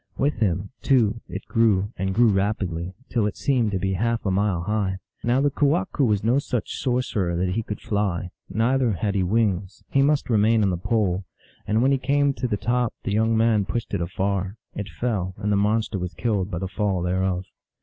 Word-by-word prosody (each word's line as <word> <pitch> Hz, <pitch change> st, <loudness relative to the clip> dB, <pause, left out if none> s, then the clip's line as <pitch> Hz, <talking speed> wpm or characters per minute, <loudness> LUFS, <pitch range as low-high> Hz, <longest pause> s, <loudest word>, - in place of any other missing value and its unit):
With 145 Hz, -1 st, +1 dB
him, 100 Hz, -1 st, 0 dB
too, 115 Hz, -4 st, +2 dB
it 95 Hz, +3 st, -6 dB
grew, 105 Hz, -3 st, +2 dB
and 95 Hz, 0 st, -2 dB
grew 120 Hz, +1 st, +5 dB
rapidly, 95 Hz, -3 st, -1 dB
till 115 Hz, -4 st, +1 dB
it 105 Hz, -, -5 dB
seemed 125 Hz, -6 st, +1 dB
to 100 Hz, -, -1 dB
be 95 Hz, +1 st, -1 dB
half 115 Hz, +4 st, -1 dB
a 95 Hz, -, +1 dB
mile 95 Hz, -2 st, +1 dB
high. 100 Hz, -2 st, -1 dB, 0.3 s
Now 120 Hz, +3 st, +2 dB
the 145 Hz, 0 st, +2 dB
ke 145 Hz, -, -13 dB
wahqu 150 Hz, +1 st, +2 dB
was 105 Hz, -5 st, +2 dB
no 120 Hz, +5 st, +3 dB
such 125 Hz, -4 st, -3 dB
sorcerer 120 Hz, -9 st, 0 dB
that 90 Hz, +2 st, 0 dB
he 110 Hz, +5 st, 0 dB
could 105 Hz, -2 st, -6 dB
fly; 95 Hz, -4 st, -1 dB, 0.2 s
neither 120 Hz, +1 st, +2 dB
had 100 Hz, +3 st, -1 dB
he 100 Hz, -, +1 dB
wings; 100 Hz, -1 st, 0 dB
he 135 Hz, -, +4 dB
must 145 Hz, +1 st, +2 dB
remain 110 Hz, -1 st, +3 dB
on 95 Hz, -, +2 dB
the -, -, 0 dB
pole; 95 Hz, -2 st, 0 dB, 0.4 s
and 110 Hz, +3 st, +2 dB
when 135 Hz, -, +4 dB
he 135 Hz, -, +2 dB
came 140 Hz, +1 st, +2 dB
to 130 Hz, -, -2 dB
the 105 Hz, -3 st, -1 dB
top 120 Hz, +2 st, 0 dB
the -, -, -2 dB
young 110 Hz, +1 st, +2 dB
man 110 Hz, -2 st, +3 dB
pushed 120 Hz, +3 st, -4 dB
it -, -, 0 dB
afar. 95 Hz, +2 st, -1 dB, 0.2 s
It 105 Hz, -1 st, -5 dB
fell, 95 Hz, -2 st, -2 dB
and 105 Hz, -, -1 dB
the -, -, +3 dB
monster 105 Hz, 0 st, +1 dB
was 90 Hz, 0 st, -5 dB
killed 105 Hz, -5 st, 0 dB
by 85 Hz, -, -3 dB
the 95 Hz, +3 st, -3 dB
fall 95 Hz, -2 st, -1 dB
thereof. 95 Hz, 0 st, 0 dB
105 Hz, 210 wpm, -24 LUFS, 95-115 Hz, 0.4 s, grew